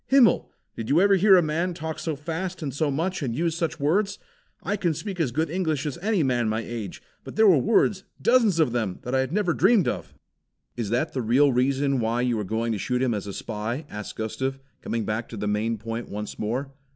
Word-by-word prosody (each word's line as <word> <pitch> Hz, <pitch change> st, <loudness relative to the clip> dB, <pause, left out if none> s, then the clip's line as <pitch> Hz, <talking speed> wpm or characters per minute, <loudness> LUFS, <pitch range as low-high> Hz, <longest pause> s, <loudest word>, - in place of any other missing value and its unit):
Himmel! 265 Hz, -4 st, +4 dB, 0.3 s
Did 115 Hz, -, -5 dB
you 150 Hz, -, +4 dB
ever 200 Hz, +2 st, +5 dB
hear 195 Hz, +1 st, +6 dB
a 175 Hz, -, +4 dB
man 165 Hz, +3 st, -1 dB
talk 160 Hz, -2 st, -5 dB
so 160 Hz, -2 st, -2 dB
fast 165 Hz, +4 st, -4 dB
and 140 Hz, -3 st, -3 dB
so 150 Hz, +1 st, 0 dB
much 170 Hz, +7 st, -1 dB
and 120 Hz, -5 st, -2 dB
use 165 Hz, +2 st, 0 dB
such 165 Hz, -1 st, -2 dB
words? 195 Hz, +8 st, +1 dB, 0.5 s
I 205 Hz, -, 0 dB
can 175 Hz, -6 st, 0 dB
speak 195 Hz, +2 st, -5 dB
as 150 Hz, -7 st, +1 dB
good 160 Hz, +6 st, 0 dB
English 160 Hz, -5 st, -1 dB
as 150 Hz, +2 st, -4 dB
any 200 Hz, -2 st, +1 dB
man 120 Hz, -4 st, +1 dB
my 110 Hz, +1 st, -1 dB
age, 115 Hz, -5 st, -6 dB, 0.2 s
but -, -, -9 dB
there 220 Hz, -, +5 dB
were 180 Hz, -8 st, +6 dB
words, 195 Hz, -, +2 dB, 0.2 s
dozens 230 Hz, -7 st, +4 dB
of 155 Hz, -7 st, +3 dB
them, 110 Hz, -6 st, -1 dB
that 125 Hz, -, -4 dB
I 130 Hz, -, +3 dB
had 130 Hz, +1 st, -1 dB
never 185 Hz, -2 st, +1 dB
dreamed 195 Hz, +2 st, +4 dB
of." -, -, -4 dB, 0.6 s
"Is 115 Hz, -4 st, -3 dB
that 125 Hz, +8 st, 0 dB
the 130 Hz, -, -1 dB
real 130 Hz, +5 st, +4 dB
reason 135 Hz, +2 st, +1 dB
why 115 Hz, +1 st, 0 dB
you 120 Hz, -3 st, +1 dB
are -, -, -1 dB
going 110 Hz, +3 st, -1 dB
to 105 Hz, -, -2 dB
shoot 125 Hz, +5 st, 0 dB
him 125 Hz, -3 st, +1 dB
as 105 Hz, -1 st, -4 dB
a -, -, -4 dB
spy?" 115 Hz, +9 st, -4 dB
asked 105 Hz, 0 st, -6 dB
Gustav, 130 Hz, +5 st, -3 dB, 0.2 s
coming 115 Hz, -2 st, -2 dB
back 110 Hz, +2 st, -3 dB
to 115 Hz, -, -7 dB
the 105 Hz, +1 st, -2 dB
main 110 Hz, +2 st, 0 dB
point 115 Hz, +2 st, -5 dB
once 105 Hz, +1 st, -6 dB
more. 125 Hz, +6 st, -2 dB
140 Hz, 235 wpm, -25 LUFS, 115-170 Hz, 0.6 s, hear